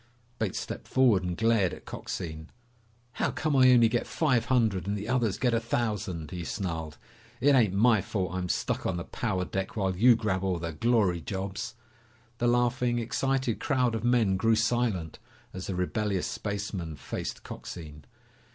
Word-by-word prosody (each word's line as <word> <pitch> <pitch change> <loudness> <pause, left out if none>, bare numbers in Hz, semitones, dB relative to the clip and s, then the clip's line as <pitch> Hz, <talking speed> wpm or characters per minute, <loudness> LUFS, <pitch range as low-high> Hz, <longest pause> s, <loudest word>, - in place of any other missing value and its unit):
Bates 110 -4 -1
stepped - - -6
forward 125 -8 +4
and 90 -1 -3
glared 115 -5 +2
at - - -16
Coxine. 80 -1 -6 0.7
"How - - +2
come 155 -2 -1
I 130 -1 +7
only 120 -2 +6
get 120 +1 -1
five 130 -8 +1
hundred 110 -8 +1
and 100 +1 -1
the 105 +2 -5
others 120 -5 +1
get 125 -2 +1
a 115 - +3
thousand?" 105 -8 -2
he 90 -2 -4
snarled. 80 -5 -4 0.4
"It 145 +4 +4
ain't 110 -8 +4
my 110 0 +4
fault 90 -2 -3
I'm 90 -1 -3
stuck - - -1
on 90 - -1
the 85 - -3
power 95 -4 -2
deck 95 +4 -4
while 95 -3 0
you 120 +6 +6
grab 100 -5 -1
all 95 -2 0
the 85 0 -4
glory 100 -2 +2
jobs!" 95 +5 -4 0.6
The 120 - +2
laughing, 120 0 +2
excited 130 +1 0
crowd 125 -4 +1
of 115 -1 -3
men 120 -6 +3
grew 115 +3 +3
silent 110 -7 0 0.3
as 95 0 -6
the 95 - -3
rebellious 95 +1 -1
spaceman 100 -6 -4
faced - - -5
Coxine. 75 -3 -9
105 Hz, 170 wpm, -28 LUFS, 90-120 Hz, 0.7 s, I